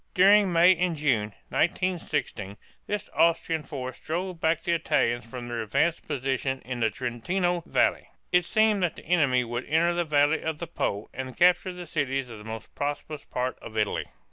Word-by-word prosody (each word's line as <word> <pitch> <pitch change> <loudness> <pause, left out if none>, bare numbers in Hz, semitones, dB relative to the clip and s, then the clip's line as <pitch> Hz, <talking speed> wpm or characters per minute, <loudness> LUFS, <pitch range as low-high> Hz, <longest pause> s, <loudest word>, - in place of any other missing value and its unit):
During 195 +1 +6
May 175 +2 +6
and 180 -1 0
June, 120 -9 0 0.2
1916, 160 - -1 0.3
this 210 0 -3
Austrian 165 -1 +2
force 130 -3 -6
drove 175 +1 -4
back 160 0 +1
the 175 - 0
Italians 150 -8 +1
from 120 +1 -7
their 120 -1 -3
advanced 140 +10 0
positions 135 -2 -2
in 125 -1 -4
the 110 -1 +2
Trentino 170 - -1
valley. - - +1 0.2
It 180 -1 +4
seemed 215 0 +3
that 175 -3 0
the - - -12
enemy 145 -7 +3
would 120 +1 -4
enter 165 +3 +2
the 175 0 0
valley 150 0 +2
of 160 -1 -2
the 170 - -5
Po 105 -10 -2
and 130 0 -6
capture 180 +1 +4
the 180 -1 -8
cities 135 -5 -2
of 110 - -9
the - - -11
most 110 0 -8
prosperous 145 +1 -4
part 125 +1 -3
of 110 - -9
Italy. 105 -1 0
150 Hz, 180 wpm, -27 LUFS, 125-175 Hz, 0.3 s, During